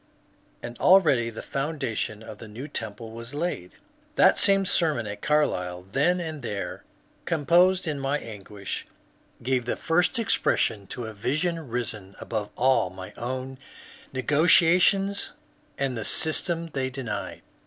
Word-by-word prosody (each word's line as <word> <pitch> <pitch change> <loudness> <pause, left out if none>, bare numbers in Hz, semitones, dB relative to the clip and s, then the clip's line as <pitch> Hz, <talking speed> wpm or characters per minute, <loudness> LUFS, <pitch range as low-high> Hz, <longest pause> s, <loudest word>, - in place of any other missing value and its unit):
And 120 0 -7
already 155 -11 +5
the 115 - -8
foundation 135 -7 -3
of 110 -2 -10
the 110 - -9
new 115 +7 -7
temple 110 -3 -6
was 115 +4 -8
laid. 150 - -3 0.4
That - - +5
same 195 -1 +4
sermon 155 -10 +1
at 105 0 -6
Carlisle, 90 -12 0
then 175 - +2
and 160 -4 -5
there 105 -5 -4 0.4
composed 175 +4 +3
in 150 -2 -2
my 135 +2 0
anguish, 105 -4 -7 0.6
gave 125 -1 +1
the 120 - -1
first 180 +9 +1
expression 110 - +1
to 120 +3 -5
a 110 - -6
vision 155 - -1
risen 105 -5 -4
above 105 -2 -3
all 130 -6 +3
my 95 0 -9
own 130 +2 -5 0.5
negations 175 +8 +4 0.4
and 135 -2 -1
the 115 - -3
systems 165 - -1
they 130 -1 -1
denied. 110 -7 -5
130 Hz, 135 wpm, -26 LUFS, 110-160 Hz, 0.6 s, already